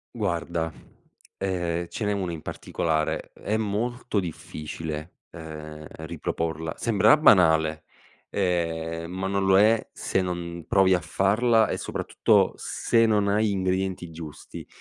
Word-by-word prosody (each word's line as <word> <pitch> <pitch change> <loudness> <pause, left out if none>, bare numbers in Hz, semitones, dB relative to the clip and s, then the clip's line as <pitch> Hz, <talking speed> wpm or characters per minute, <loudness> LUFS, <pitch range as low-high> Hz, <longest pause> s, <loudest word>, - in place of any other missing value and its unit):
Guarda, 85 -5 -2 0.6
ehm, 85 -3 -2
ce 110 - -5
n'è 105 - +1
1 95 -4 -2
in 80 - -7
particolare, 80 -2 -2
è 110 - -3
molto 110 +1 -1
difficile, 80 -1 -6
ehm, 75 -1 -9
riproporla. 80 0 -4
Sembrerà 110 +2 +5
banale, 80 - +4 0.4
ehm, 85 -3 -1
ma 95 +1 -3
non 100 0 0
lo 95 0 +5
è 110 +2 +4
se 95 - -1
non 85 -2 -4
provi 95 -1 +4
a - - +1
farla 110 +7 +2
e, - - -1
soprattutto, - - +2
se 115 -1 +1
non 105 -2 +2
hai 105 +1 +2
ingredienti 95 -2 -1
giusti 80 -2 -9
90 Hz, 125 wpm, -26 LUFS, 80-100 Hz, 0.6 s, Sembrerà